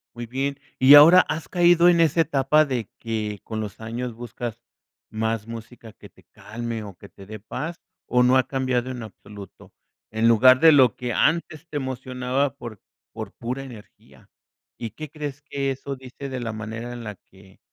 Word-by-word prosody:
Muy 120 0 -6
bien, 135 +4 -3 0.2
y 135 +2 +9
ahora, 165 +5 +9
¿has 160 -3 -5
caído 175 -1 +5
en 170 -1 +3
esa 165 0 +3
etapa 150 0 +2
de 125 -7 -3
que, 110 -3 -4
con 110 - -5
los 105 -2 -7
años, 115 +2 -5
buscas 120 0 -7 0.5
más 110 0 -2
música 115 -1 -10
que - - -15
te - - -24
calme 115 0 -6
o 100 -3 -10
que 100 - -14
te 100 - -15
dé 110 +2 -9
paz 150 - -6 0.3
o 125 0 +3
no 125 +1 +4
ha 130 - +1
cambiado 130 -2 -1
en 125 -2 -6
absoluto?, 100 -2 -13 0.4
en 110 +1 +1
lugar 125 +3 +6
de 165 0 +8
lo 130 -7 +5
que 125 -1 -4
antes 160 +2 0
te 150 - -4
emocionaba 130 +1 -2
por 115 -7 -9 0.3
por - - -7
pura 125 +3 -5
energía. 120 -6 -15 0.5
¿Y 115 -2 -6
qué 155 -1 -9
crees 145 -2 -7
que 140 -1 -3
eso 135 +1 -6
dice 130 +1 -9
de 130 - -4
la 115 -2 -4
manera 110 +3 -6
en 120 -1 -8
la 105 -2 -7 0.2
que 95 0 -19
125 Hz, 185 wpm, -23 LUFS, 110-140 Hz, 0.5 s, y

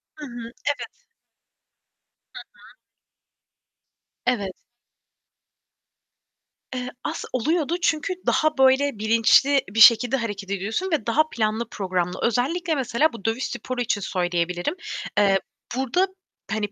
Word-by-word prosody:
Hı 300 - -8
hı. 235 -3 -8 0.2
Evet. 475 +11 -5 1.3
Hı - - -8
hı. - - -18 1.5
Evet. 215 -6 0 2.2
Eee, 250 0 -3
as - - -3
oluyordu 310 +6 0
çünkü 330 +2 +1
daha, 310 -2 +2
böyle, 265 -2 +3
bilinçli 230 +5 +4
bir 220 - -3
şekilde 245 +3 +7
hareket 205 -5 -5
ediyorsun 220 - -2
ve 295 -9 0
daha 270 +7 +4
planlı 220 -1 -1
programlı. 180 -3 -2
Özellikle, 310 - 0
mesela, 270 +2 +1
bu 200 - -11
dövüş 225 +3 0
sporu 245 +1 -4
için 220 -3 0
söyleyebilirim. 175 - -1 0.4
Eee, 200 -2 +4 0.4
burada, 265 +9 +1 0.4
hani, 215 -2 -1
235 Hz, 110 wpm, -24 LUFS, 210-285 Hz, 2.2 s, şekilde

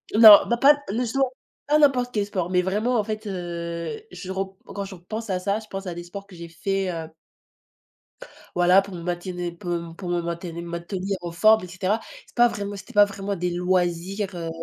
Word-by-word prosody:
Non, 215 -2 +11
bah, 235 - +1
pas 290 +4 +6
non 225 +4 -1
justement, 255 +2 0 0.4
pas 300 +1 +4
n'importe 260 -5 +3
quel 205 -2 +1
sport, 185 -4 -2
mais 180 0 +3
vraiment, 215 +7 0
en 215 - +2
fait 215 0 -5
heu, 170 - -4
je 185 - -7
rep 190 0 -2 0.2
quand 200 -1 -5
je 195 0 -9
repense 215 +6 -7
à 185 -1 0
ça, 200 +3 0
je 220 - -13
pense 195 -1 -6
à 180 - -3
des 175 0 -7
sports 195 +3 -9
que 200 -2 -15
j'ai 170 0 -8
fait, 195 +3 -2
heu 165 -2 -5 1.5
voilà 180 +2 +6
pour 195 0 -10
me 170 - -7
maintenir 175 0 -3
pour 175 +1 -6
m 170 -1 -4
pour 180 - -6
me 175 0 0
mainteni 170 0 -5
maintenir 175 +3 -4
en 175 -1 -5
forme, 215 +4 +5
et - - -10
cetera. 185 +4 -1 0.3
C'est - - -23
pas 240 0 +6
vraiment 205 -3 -4
c'était 195 - -11
pas 205 0 +7
vraiment 200 0 -4
des 180 -1 -2
loisirs, 180 +2 0
heu, 165 -1 -4
190 Hz, 215 wpm, -24 LUFS, 175-210 Hz, 1.5 s, Non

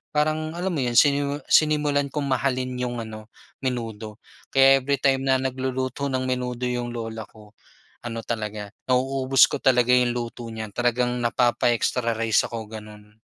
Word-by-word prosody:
parang 155 +1 0
alam 180 +2 -2
mo 160 - -2
'yon, 120 -1 -1
sinimu 145 -1 +3
sinimulan 150 -2 +3
kong 145 +1 -3
mahalin 130 -1 0
yung 120 -2 -3
ano 110 -1 -9 0.3
menudo. 115 -5 -4 0.3
Kaya 135 0 +6
every 140 +2 0
time 135 -1 +2
na 130 - +4
nagluluto 130 +1 -2
ng 130 -1 -1
menudo 125 -1 -3
yung 120 -1 -2
lola 115 -1 -5
ko, 105 -1 -17 0.5
ano 115 -1 -4
talaga, 105 -3 -4 0.2
nauubos 130 0 +3
ko - - -1
talaga 125 -2 +3
yung 125 -1 +3
luto 120 0 -5
niya. 110 -1 -5
Talagang 120 0 0
napapa-extra 120 0 +1
rice 115 -1 +2
ako, 110 -2 -6
gano'n. 105 -1 -11
125 Hz, 155 wpm, -24 LUFS, 115-135 Hz, 0.5 s, Kaya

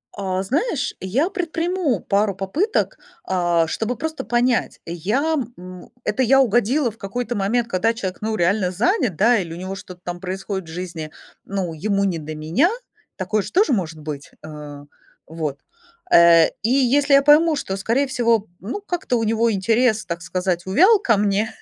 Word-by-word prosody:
А 190 -2 -2
знаешь, 280 - -1
я 250 - 0
предприму 340 - -1
пару 200 -1 0
попыток, 285 - -1 0.3
а, 175 -2 +1
чтобы 225 +9 -2
просто 315 +1 -4
понять: 240 0 0
я, 215 - -1 0.2
м 180 0 -11
это 210 +5 -1
я 270 +2 +5
угодила 240 +2 +2
в 225 - -20
какой-то 240 +4 -4
момент, 225 +4 0
когда 225 +2 +1
человек, 185 -4 -5
ну, 220 0 -1
реально 185 +1 +1
занят, 235 - +1
да, 235 +8 +4
или 170 -4 -3
у - - -6
него 185 +2 -5
что-то 180 -2 -11
там 175 0 -5
происходит 190 -1 -5
в - - -8
жизни, 170 -3 -6 0.4
ну, 190 -4 -3
ему 200 +5 0
не 185 -4 0
до 155 0 -7
меня. 165 - +2 0.5
Такое 210 +3 -1
же - - -8
тоже 360 -7 +3
может 165 -6 -2
быть. 150 -2 -7
А. 150 -2 -9 0.4
Вот. 155 -3 -4 0.5
Э, 170 -1 +7
и 220 - +1
если 275 +2 +3
я 275 - +7
пойму, 305 +3 +5
что, 195 -9 -3
скорее 235 +8 0
всего, 230 -5 +1
ну, 235 - -5
как-то 355 -10 -2
у 225 - -1
него 225 +1 +2
интерес, 220 +3 +1
так 170 -1 -4
сказать, 180 -1 -2
увял 375 - +5
ко 230 - +2
мне, 205 +2 0
205 Hz, 170 wpm, -21 LUFS, 180-255 Hz, 0.5 s, Э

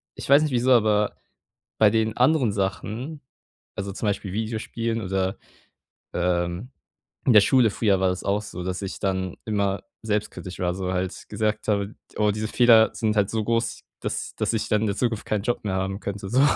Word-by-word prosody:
ich - - -7
weiß 140 +2 +7
nicht 155 -2 0
wieso, 125 +1 +2
aber, 105 -3 +3 0.6
bei 110 - +6
den 110 0 +1
anderen 130 -4 +3
Sachen, 110 +9 -3 0.6
also, 100 0 -4
zum 105 - -3
Beispiel 100 -1 -2
Videospielen 115 +1 -2
oder, 95 -1 -1 0.8
ähm 90 +5 -1 0.5
in 125 - +5
der 105 - +9
Schule 125 +1 +4
früher 100 -2 +2
war 95 0 +3
das 90 0 -3
auch 100 +1 +1
so, 90 -4 -7
dass 90 +1 -3
ich 95 -1 -5
dann 95 -2 -1
immer 100 -2 0 0.2
selbstkritisch 105 -3 -3
war, 90 -1 0
so 90 0 -3
halt 90 0 -3
gesagt 110 -1 -1
habe: 100 0 0 0.2
„Oh, 105 0 +3
diese 110 +1 -3
Fehler 115 -1 +6
sind 110 -2 0
halt 100 -2 +2
so 110 -1 -1
groß, 115 +2 -1 0.2
dass - - -3
dass - - -1
ich 110 - -1
dann 105 0 +2
in 110 - +1
der 100 - -1
Zukunft 115 -4 0
keinen 105 -2 -1
Job 120 +1 -1
mehr 100 -3 -1
haben 95 +1 -2
könnte, 100 -1 -5
so.“ 130 +3 +4
105 Hz, 190 wpm, -25 LUFS, 95-115 Hz, 0.8 s, der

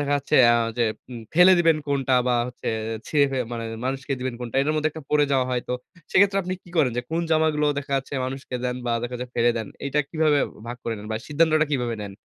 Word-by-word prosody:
দেখা 145 0 -1
যাচ্ছে 140 - 0 0.2
আ - - +4 0.2
যে 120 - +3 0.3
উম 120 -2 -7
ফেলে 180 +3 +8
দিবেন 165 -2 +4
কোনটা 135 -2 +1
বা, 125 - +3
হচ্ছে 125 - -6 0.4
ছিঁড়ে 145 -2 +3
ফেলে 130 -2 -1
মানে 115 -1 -4 0.2
মানুষকে 135 +1 -2
দিবেন 130 -1 -3
কোনটা? 120 -1 -6
এটার 150 +3 +1
মধ্যে 155 0 +1
একটা 160 - -8
পড়ে 150 -1 +4
যাওয়া 130 -2 +2
হয় 125 -1 -1
তো - - -1 0.4
সেক্ষেত্রে 195 +1 +4
আপনি 185 +1 -4
কি - - -18
করেন 145 -6 +4
যে - - +1
কোন 165 +1 0
জামাগুলো 155 -1 +2
দেখা 140 0 -6
যাচ্ছে 135 +1 -4
মানুষকে 130 0 -6
দেন 125 0 -1
বা 120 - +1
দেখা 120 +1 -4
যায় 125 - -5
ফেলে 120 0 +3
দেন? 110 -2 -3 0.2
এইটা 140 +1 0
কিভাবে 155 -2 +2 0.3
ভাগ 120 +1 -5
করে 115 - -2
নেন 105 - -9
বা, 110 - -1
সিদ্ধান্তটা 155 +1 +3
কিভাবে 120 -4 0
নেন? 100 -1 -6
135 Hz, 235 wpm, -24 LUFS, 125-155 Hz, 0.4 s, ফেলে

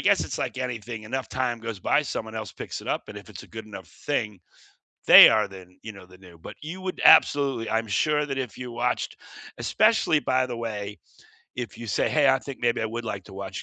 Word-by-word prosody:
guess - - +3
it's - - -5
like - - -3
anything, 120 -3 -5
enough 130 +5 -4
time 125 -2 -2
goes 115 -3 -6
by, 95 - +2
someone 110 -6 -5
else 110 -2 -5
picks - - -7
it - - -10
up, - - -2
and - - -8
if - - -15
it's - - -10
a - - -14
good 110 -1 -9
enough 100 -5 -10
thing, 110 -5 -3 0.7
they - - +11
are 110 -1 +2
then, 90 -1 -14
you 110 - -7
know, 100 -3 -13
the 90 0 -17
new, 90 -3 -16
but 80 - -11
you 165 +5 -7
would 185 -1 -5
absolutely 135 -5 +5
I'm 115 0 -1
sure 150 +9 +1
that 135 -2 -4
if 130 -4 -5
you 125 -1 -7
watched 120 +1 -2 0.4
especially, 215 -8 +2
by 130 -2 +1
the 125 -1 -5
way, 105 -3 -5 0.6
if 120 -5 -6
you 120 - -8
say, - - +1
"Hey, 150 -3 +3
I 135 0 +4
think 135 0 -9
maybe 120 -1 +1
I 110 - -1
would 115 +2 -5
like 100 -3 -5
to 100 - -14
watch," 95 0 -6
115 Hz, 235 wpm, -25 LUFS, 105-130 Hz, 0.7 s, they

